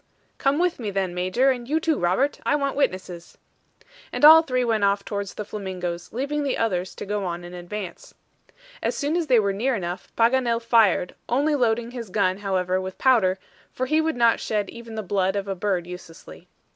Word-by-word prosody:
"Come 275 +1 +2
with 355 -2 0
me, 220 -4 -3
then, 190 -2 -2
Major, 185 +10 +2
and 245 -1 -5
you 315 +2 +2
too 320 -2 0
Robert. 190 +12 +1
I - - +2
want 280 -2 -1
witnesses." 185 -9 -3 0.7
And - - +3
all 320 +1 +10
three 255 -5 -1
went 220 -3 +1
off 200 0 +2
towards 200 -2 -4
the 210 - -5
flamingos, 180 -4 -5
leaving 280 +5 -2
the 280 -2 -1
others 185 -5 -1
to - - -7
go 205 0 -2
on 175 -1 -4
in 175 0 -9
advance. 180 +1 -7 0.7
As - - -1
soon 290 +2 -1
as 340 -3 0
they 250 -4 +5
were 200 -2 +1
near 245 +6 0
enough, 180 -2 -5
Paganel 235 0 +2
fired, 225 -6 +3 0.2
only 285 +5 +2
loading 235 -3 +1
his 235 -4 -7
gun, 185 -1 +1
however, 185 -2 0
with 190 0 -7
powder, 220 -8 +3 0.3
for 255 - -2
he 310 +4 +2
would 320 0 -1
not 235 -1 +3
shed 210 -2 -2
even 230 -1 -10
the 215 - -3
blood 190 0 0
of 200 0 -2
a 195 - -1
bird 185 -2 -1
uselessly. 180 -2 -11
210 Hz, 200 wpm, -24 LUFS, 185-255 Hz, 0.7 s, all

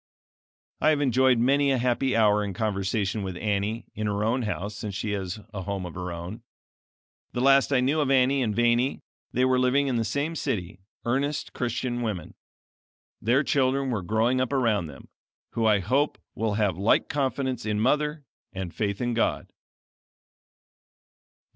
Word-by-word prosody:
I 155 - +4
have 155 -2 +3
enjoyed 130 -2 +3
many 140 +4 +3
a 135 - +3
happy 125 +2 +1
hour 105 -2 +4
in 100 -2 -4
conversation 100 0 -1
with 95 -2 -4
Annie 105 +2 -1
in 110 0 -3
her 105 0 -1
own 120 +4 +1
house 105 -2 -3
since 105 -1 -5
she 105 +1 -2
has 95 0 -3
a 95 - -4
home 95 0 -4
of 85 - -7
her 90 0 -5
own. 85 +7 -7 0.9
The - - -2
last 135 +1 +5
I 130 -2 +3
knew 145 +5 +2
of 140 - 0
Annie 135 0 +3
and 110 -4 0
Vanie 120 +3 +2 0.3
they 125 - +2
were 130 0 +3
living 130 +3 +3
in 130 -3 0
the 115 - +1
same 145 +8 -2
city, 90 - -3 0.3
earnest 140 +4 -1
Christian 120 0 -2
women. 100 -8 -4 0.9
Their 125 +7 +3
children 135 0 +1
were 110 -5 -1
growing 110 +7 +1
up 130 - -1
around 115 - +1
them, 70 -3 -12 0.4
who, 115 -1 +1
I 105 -1 +5
hope, 135 +10 +1 0.2
will 110 -2 -1
have 100 -5 0
like 100 +3 +3
confidence 135 -3 -1
in 105 -1 -1
mother, 150 +5 +1 0.3
and 95 -2 -5
faith 100 -1 -2
in 120 -1 0
God. 115 - -1
115 Hz, 170 wpm, -26 LUFS, 105-130 Hz, 0.9 s, last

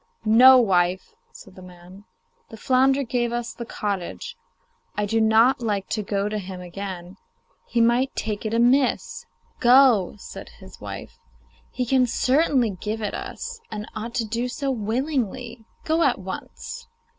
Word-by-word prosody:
'No, 250 +4 +8
wife,' 185 -4 +1 0.2
said 190 - -14
the 185 - -13
man; 180 +2 -14 0.4
'the 225 - -10
flounder 265 +4 +2
gave 240 -1 -1
us 240 0 -3
the 235 - -8
cottage. 205 - -4 0.6
I 210 - +1
do 225 +2 +1
not 225 +4 +4
like 205 -4 -2
to 215 - -1
go 200 0 -2
to 210 0 -3
him 185 -1 -8
again; 180 0 -7 0.5
he 235 - +1
might 240 +3 +2
take 210 -1 -3
it 215 - -3
amiss.' 245 +4 +1 0.3
'Go,' 245 -7 +5
said - - -10
his - - -14
wife. - - -8 0.5
'He 250 - -2
can 255 0 +3
certainly 255 -1 +2
give 210 +4 -5
it 205 - -2
us, 470 0 -6
and 215 0 -6
ought 230 +3 -6
to 235 -3 0
do 230 +3 -2
so 275 +2 -3
willingly. 240 0 -3 0.2
Go 320 +1 +1
at 275 -6 +3
once. 205 - -8
230 Hz, 155 wpm, -23 LUFS, 200-255 Hz, 0.6 s, No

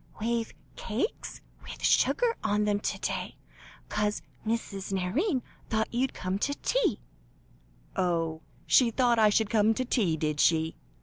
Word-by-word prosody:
"We've 230 +1 -1 0.2
cakes 235 - -3 0.2
with - - -10
sugar 475 -1 +3
on 210 +1 +1
them 205 -1 +1
to - - -2
day, - - -3 0.5
'cos 210 0 -1 0.2
Mrs. 215 -4 -3
Nairne 245 - 0 0.3
thought 220 0 0
you'd 255 +3 0
come 185 +2 -2
to 285 +6 0
tea." - - 0 0.9
"Oh! 165 -3 0 0.2
she 250 -3 +5
thought 240 0 +2
I 215 -1 +6
should 210 0 +1
come 220 0 +4
to 255 - -1
tea, 200 -10 +1
did 150 -1 -1
she?" 160 0 +3
215 Hz, 140 wpm, -29 LUFS, 190-240 Hz, 0.9 s, I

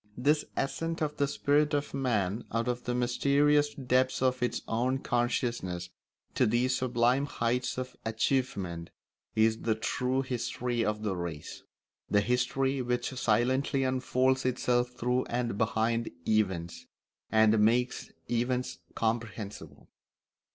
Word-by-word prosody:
This 150 +5 +2
ascent 165 +4 -1
of 150 -1 -3
the 140 - +2
spirit 145 +2 +2
of 145 0 -2
man 115 -6 0
out 115 +2 -1
of 125 0 -2
the 120 - -1
mysterious 145 +4 +2
depths 130 -1 +1
of 130 -1 +1
its 125 - -1
own 125 +4 +1
consciousness 120 -8 -1 0.4
to - - +3
these 125 +4 +2
sublime 125 +2 +2
heights 125 -2 -1
of 130 0 -5
achievement 110 -7 -1 0.5
is 110 0 +3
the 110 -1 +1
true 125 +4 -1
history 125 -1 -2
of 105 0 -1
the 100 -3 -1
race; 85 -4 -6 0.5
the 105 - +4
history 130 +4 0
which 125 +1 -1
silently 130 +3 +1
unfolds 130 0 +1
itself 125 -1 +1
through 125 +1 -1
and 120 -3 -2
behind 115 +1 +1 0.2
events, 95 -6 0 0.4
and 110 0 +5
makes 120 +4 +2 0.2
events 125 +1 -1 0.2
comprehensible. 110 -2 -4
125 Hz, 125 wpm, -30 LUFS, 110-130 Hz, 0.5 s, and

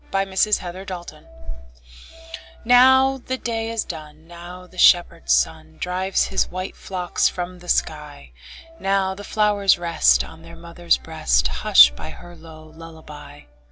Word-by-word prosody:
Louisa 195 +1 0
May - - -9
Alcott 195 - -9 0.2
Lullaby 155 0 -18 1.4
NOW 260 +2 +5
the 260 +1 -5
day 225 -2 -4
is 230 -1 -2
done, 155 -2 -10
Now 175 +1 -11
the 180 0 -14
shepherd 175 - +3
sun 75 +5 0
Drives 185 +1 -1
his 190 - -1
white 185 +1 -6
flocks 180 -2 -2
from 180 0 -7
the 175 0 -13
sky; 150 - -3 0.5
Now 195 -1 0
the 200 +2 -11
flowers 205 -2 +1
rest 170 -1 +2
On 160 0 -13
their 165 0 -13
mother's 170 +1 -1
breast, 65 - 0
Hushed 65 +1 +5
by - - -9
her 175 0 -13
low 160 -1 -14
lullaby. 155 - -13
175 Hz, 145 wpm, -21 LUFS, 155-195 Hz, 1.4 s, NOW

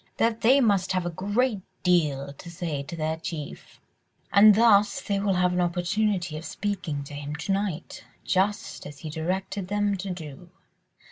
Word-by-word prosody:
that 230 0 +1
they 260 +5 +6
must 200 -7 +2
have 185 -1 0
a 175 - -2
great 205 +5 0 0.2
deal 145 -6 +1
to 170 - -11
say 165 -4 -3
to 150 +4 -7
their 160 0 -2
chief... 160 -3 -7 0.5
and 210 +1 +8
thus 210 -2 +5
they 200 -1 -1
will 200 -1 +1
have 180 0 +2
an 180 - +1
opportunity 180 0 0
of 155 - -7
speaking 185 -7 -3
to 140 - -10
him 145 +1 -5
to 160 +6 -3
night, 195 -4 -3 0.2
just 195 -2 -1
as 145 -1 -10
he 155 - -6
directed 185 +4 -3
them 205 0 +1
to 195 +1 -5
do. 175 -1 -8
180 Hz, 175 wpm, -26 LUFS, 160-205 Hz, 0.5 s, and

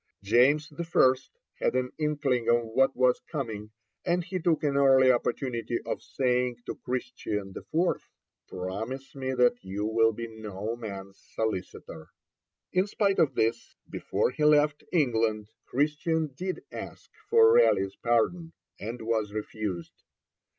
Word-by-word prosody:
James 140 +9 +3
I. 165 -6 +3 0.4
had - - +1
an 125 0 0
inkling 145 -6 0
of 120 0 +4
what 135 +4 +2
was 125 -1 +3
coming, 110 -9 -4 0.3
and 175 0 +1
he 185 +1 -4
took 165 -2 +1
an 145 -2 +1
early 135 -2 +6
opportunity 120 -1 -1
of - - -3
saying 125 -2 0
to - - -4
Christian 115 -6 -4
IV., 175 +3 -1 0.4
'Promise 110 +9 -5
me 130 -1 -3
that 125 -1 +3
you 100 +2 -3
will 115 +1 +3
be 115 +1 -6
no 110 -1 -5
man's 100 -4 -8 0.2
solicitor.' 95 -6 -4 0.6
In 185 +2 +2
spite 200 -1 +1
of 135 -5 +3
this, 115 +1 -1
before - - -1
he 150 - -3
left 150 0 +4
England, 115 - +1 0.2
Christian 155 +2 0
did 185 +3 -4
ask - - -9 0.2
for 455 -1 +6
Raleigh's 95 - +4
pardon, 160 +9 0 0.3
and 115 +3 -6
was 110 -2 -1
refused. 105 -4 -5
125 Hz, 135 wpm, -28 LUFS, 110-150 Hz, 0.6 s, early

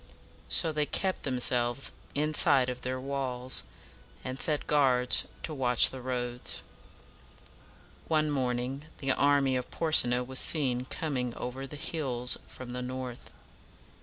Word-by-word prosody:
So 165 - +3
they 150 -1 -1
kept 190 -2 -2
themselves 125 -1 +3 0.2
inside 145 -3 +2
of 125 0 -6
their 130 0 -3
walls, 130 -2 -2 0.6
and 130 +1 -5
set 150 -2 +1
guards 130 -4 +3 0.2
to 160 - -5
watch 125 -4 +3
the 130 - -8
roads. 125 -1 -2 1.4
One 155 -1 +1
morning 130 +1 -2
the 135 -1 -1
army 140 -1 +2
of 125 -1 -3
Por 165 -2 -3
se 140 - +7
na 125 +1 0
was 130 +1 0
seen 130 -5 +3
coming 130 -5 -3
over 130 +2 -6
the 150 - -9
hills 130 -6 +1
from 125 -1 -10
the 125 - -4
north. 125 -1 -7
130 Hz, 135 wpm, -29 LUFS, 125-145 Hz, 1.4 s, se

